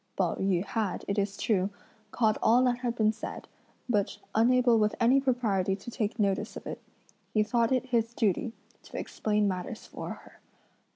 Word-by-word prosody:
Pao - - +2
yü 190 -1 +1
had, 210 -3 -2
it 200 +1 0
is 200 0 -1
true, 195 -3 +1 0.4
caught 220 -3 +1
all 245 +3 +5
that 245 -1 +2
had 240 -2 -2
been 215 -2 +3
said, 220 - -7 0.4
but 210 -5 0 0.2
unable 240 +1 +4
with 210 0 +2
any 250 +4 +5
propriety 215 -8 +1
to 200 +5 -9
take 220 -2 -2
notice 200 -3 0
of - - -10
it, - - -6 0.5
he 215 - +5
thought 230 +2 +1
it 260 0 +2
his 235 -2 0
duty 220 +1 +1 0.3
to - - -9
explain 210 -1 0
matters 185 +4 -4
for - - -7
her. - - -10
220 Hz, 175 wpm, -29 LUFS, 200-240 Hz, 0.5 s, all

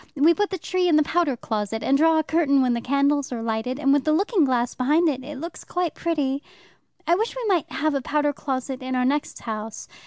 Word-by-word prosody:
We 305 +4 +5
put 415 +4 0
the 380 - -3
tree 365 +1 0
in 330 - +4
the 305 - +5
powder 300 -5 0
closet, 220 0 -3
and 275 - +2
draw 320 +2 +4
a 315 - +2
curtain 290 -4 +2
when 250 -1 +2
the 235 - -2
candles 280 +2 +1
are 235 -2 -4
lighted, 225 +3 -2
and 275 -2 +2
with 285 -1 +2
the 310 - +1
looking 375 +1 +2
glass 245 -2 0
behind 300 +7 +2
it 280 0 -3
looks 335 +3 -7
quite 355 -2 -2
pretty. 285 -5 -1 0.6
I 340 - +3
wish 440 +7 0
we - - -4
might 370 -7 0
have 310 0 0
a 275 - -1
powder 295 +2 0
closet 265 -2 -4
in 260 0 -3
our 250 0 +1
next 285 +3 -1
house. 220 -1 -6
285 Hz, 230 wpm, -24 LUFS, 255-325 Hz, 0.6 s, We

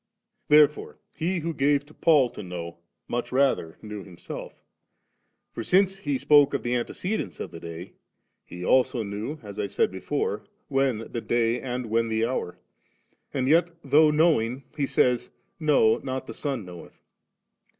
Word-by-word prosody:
4& - - -54
Therefore 150 0 +4 0.2
He 175 +3 -1
who 165 +1 -2
gave 145 0 +2
to 155 - -18
Paul 145 -8 +4
to - - -8
know, 85 -3 -7 0.3
much 120 - -3
rather 130 -11 +1
knew 105 -2 -7
Himself; 90 -3 -9 0.9
for 115 - -5
since 195 - +3
He 145 -8 -2
spoke 145 +1 +5
of 140 - -2
the 120 - -1
antecedents 180 - -3
of - - -5
the 85 - -9
day, 85 +2 -8 0.5
He 90 +1 -8
also 130 -1 +3
knew, 105 +9 -5
as 105 0 -8
I 105 - -1
said 100 - +1
before, 95 -1 -2 0.3
when 135 -5 0
the 115 - -3
Day 120 0 +1
and 125 -1 -3
when 115 0 +2
the 110 0 +1
Hour, 115 -7 -3 0.7
and 130 -1 -1
yet 170 +4 +4
though 150 +3 +5
knowing, 150 -5 +2
He 145 -2 0
says, 125 -2 +2 0.2
* - - -47
No, 110 -6 +5
not 130 -1 -4
the - - -7
Son 135 -8 -3
knoweth.' 90 -2 -12
125 Hz, 165 wpm, -26 LUFS, 110-145 Hz, 0.9 s, spoke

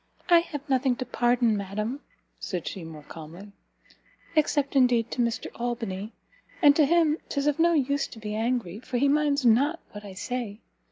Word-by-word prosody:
"I 345 -1 +8
have 295 -4 -6
nothing 260 -2 +2
to 255 - -5
pardon, 240 -1 +2
madam," 210 +6 -3 0.4
said 180 -4 -4
she, 190 - -5
more 160 -2 -10
calmly, 165 +7 -11 0.8
"except, 290 -2 +1
indeed, 245 -3 +3
to 245 - -1
Mr 235 -1 -1
Albany; 225 -4 -4 0.5
and 290 -4 +6
to 300 -3 +4
him, 325 -1 +3
'tis 280 -1 -1
of 295 +1 +1
no 340 +1 +4
use 280 -2 +1
to - - -12
be 210 -1 -5
angry, 220 -4 -1
for 250 +1 -4
he 280 +4 +3
minds 285 -1 +2
not 280 +9 +4
what 205 0 -9
I 200 -2 -9
say! 235 0 -4
245 Hz, 175 wpm, -27 LUFS, 210-285 Hz, 0.8 s, I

